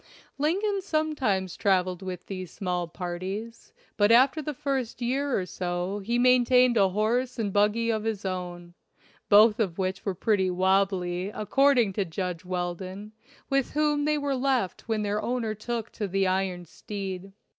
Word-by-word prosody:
Lincoln 390 +7 +1
sometimes 285 - -1
trav 190 -3 +2
eled 185 0 -6
with 185 -2 -6
these 185 -3 -6
small 180 -2 -2
parties, 185 +7 -6 0.3
but 205 +1 +4
after 265 +6 +5
the 300 - -3
first 270 -5 -2
year 265 +3 0
or 185 - -3
so 180 +2 -3
he 230 +4 -1
maintained 250 0 +5
a 195 -3 +4
horse 235 +6 0
and 210 -4 -2
buggy 215 +3 +2
of 220 -1 -1
his 220 -3 -3
own, 175 -2 -5 0.6
both 210 +2 +6
of 190 -7 -1
which 190 0 -2
were 195 -3 -2
pretty 195 -1 +1
"wobbly" 185 -1 +1
according 240 0 +2
to 200 - 0
Judge 180 0 -4
Weldon, 185 +3 -4 0.4
with 275 -1 0
whom 295 -1 +1
they 300 0 +2
were 285 -2 -1
left 255 -8 -1
when 220 -2 0
their 210 +1 -1
owner 235 -3 -1
took 225 +1 -4
to 210 - -4
the 195 +1 +1
iron 185 -1 -1
steed. 195 +1 -6
205 Hz, 160 wpm, -27 LUFS, 185-250 Hz, 0.6 s, both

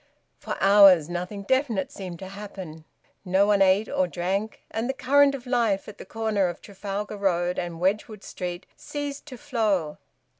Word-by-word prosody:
For - - -5
hours 195 -5 +7
nothing 180 +3 -4
definite 255 -3 0
seemed 185 -3 -7
to 190 +2 -9
happen; 190 -6 -9 0.4
no 190 +1 +3
one 205 -1 +3
ate 195 +3 +4
or 185 - 0
drank, 190 +5 -3
and 225 +3 -2
the 265 - -1
current 280 +2 +4
of 260 -2 -9
life 235 -6 +1
at 210 - -11
the - - -9
corner 220 -4 0
of 175 - -5
Trafalgar 205 +1 -6
Road 180 -2 0
and 175 -2 -5
Wedgwood 205 +3 -1
Street 180 0 -6
ceased 290 0 -6
to 255 -4 -9
flow. 215 - -1
200 Hz, 165 wpm, -25 LUFS, 180-225 Hz, 0.4 s, hours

